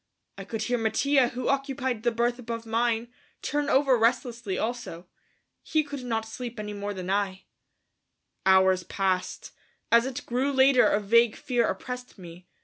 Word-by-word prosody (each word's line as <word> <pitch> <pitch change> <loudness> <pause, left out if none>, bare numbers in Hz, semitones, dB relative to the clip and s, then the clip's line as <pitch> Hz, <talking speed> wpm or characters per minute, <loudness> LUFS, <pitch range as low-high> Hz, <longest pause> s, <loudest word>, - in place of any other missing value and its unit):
I 195 - -7
could 215 +2 -4
hear 245 +1 0
Mattia, 250 +4 +2
who 245 +1 -4
occupied 270 -4 -1
the 240 - +2
berth 240 +2 0
above 230 -1 -5
mine, 230 +1 0 0.3
turn 290 0 -1
over 270 -1 +4
restlessly 235 -3 0
also. 225 -7 -4 0.6
He 310 -1 +1
could 285 -3 -7
not 225 -2 -2
sleep 235 +1 -7
any 210 0 -5
more 205 0 -5
than 185 0 -4
I. 195 -2 -1 1.0
Hours 190 -1 +4
passed. 185 0 -2 0.4
As 235 +2 +5
it 260 -1 -6
grew 255 +4 0
later 265 -1 +5
a 205 - +2
vague 230 +2 +3
fear 240 -3 0
oppressed 250 -1 -6
me. 175 -1 -12
235 Hz, 155 wpm, -27 LUFS, 205-250 Hz, 1.0 s, As